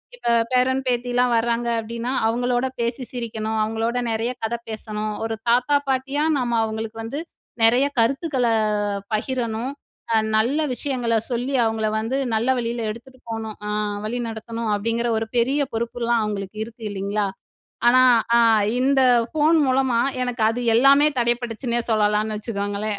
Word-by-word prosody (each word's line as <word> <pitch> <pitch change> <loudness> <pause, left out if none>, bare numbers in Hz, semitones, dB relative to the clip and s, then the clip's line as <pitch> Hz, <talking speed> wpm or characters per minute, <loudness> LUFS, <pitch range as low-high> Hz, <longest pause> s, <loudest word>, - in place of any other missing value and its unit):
இப்ப 485 - -3 0.2
பேரன், 255 +1 +2
பேத்திலாம் 245 0 +1
வராங்க 235 +1 0
அப்பிடின்னா, 230 +2 -5 0.2
அவுங்களோட 245 +2 0
பேசி 235 +2 -2
சிரிக்கணும். 220 -3 -3
அவுங்களோடு 225 +3 -1
நிறைய 225 +2 -1
கதை 235 +2 -1
பேசணும். 215 -1 -4
ஒரு 225 0 -2
தாத்தா, 250 +4 +3
பாட்டியா 270 +3 0
நம்ம 240 -2 0
அவுங்களுக்கு 220 0 -4
வந்து 255 +7 -4 0.4
நிறைய 245 +5 +5
கருத்துக்கள 265 +1 +1 0.7
பகிரணும். 235 +2 -2 0.4
அ - - +4 0.2
நல்ல 245 +7 +2 0.2
விஷயங்கள 245 -4 -1
சொல்லி, 245 +3 -2
அவுங்கள 220 -1 0
வந்து 235 +5 -2 0.2
நல்ல 230 +3 0
வழியில 235 0 -2
எடுத்துட்டு 255 +3 -13
போணும். 220 -1 -5
அ - - -3 0.4
வழி 240 +3 -2
நடத்தணும், 225 0 -5
அப்பிடிங்கிற 230 +3 -1
ஒரு 225 - -4
பெரிய 270 +4 +2
பொறுப்புலாம் 235 0 0
அவுங்களுக்கு 205 0 -4
இருக்கு 230 0 -13
இல்லீங்களா? 200 +1 -1 0.6
ஆனா, 255 +1 +6 0.3
அ - - +6 0.4
இந்த 270 +1 +3 0.3
ஃபோன் 315 +1 +3
மூலமா 255 -2 +2 0.2
எனக்கு 240 -3 -1
அது 245 +2 -3 0.2
எல்லாமே 275 +4 +6
தடைபட்டுச்சுன்னே 240 0 -1
சொல்லலான்னு 210 0 +1
வச்சுக்கோங்களேன் 205 -1 -3
235 Hz, 135 wpm, -22 LUFS, 220-250 Hz, 0.7 s, ஆனா